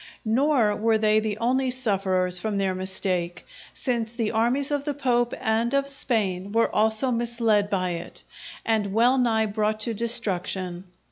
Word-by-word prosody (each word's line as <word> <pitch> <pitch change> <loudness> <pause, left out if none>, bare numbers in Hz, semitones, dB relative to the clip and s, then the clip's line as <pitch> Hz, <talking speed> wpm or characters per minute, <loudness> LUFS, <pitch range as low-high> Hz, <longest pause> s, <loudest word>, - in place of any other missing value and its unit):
Nor 235 -2 +2
were 225 +1 +2
they 215 0 +3
the 215 -1 -3
only 255 +3 +1
sufferers 190 -7 0
from 210 +1 -2
their 195 -1 0
mistake, 185 -2 -3 0.3
since 235 -4 -2
the 230 -2 -2
armies 245 +6 0
of 290 -1 -1
the 290 -1 -3
Pope 240 -3 +1
and 225 +4 0
of 275 0 +1
Spain 205 -8 0
were 230 +1 +1
also 220 +4 +2
misled 230 -3 +1
by 185 -3 -1
it, 170 0 -7 0.4
and 210 -3 0
well 245 +4 +4
nigh 225 -3 +2
brought 215 +1 -1
to 230 - -1
destruction. 190 -5 -1
220 Hz, 155 wpm, -25 LUFS, 195-240 Hz, 0.4 s, well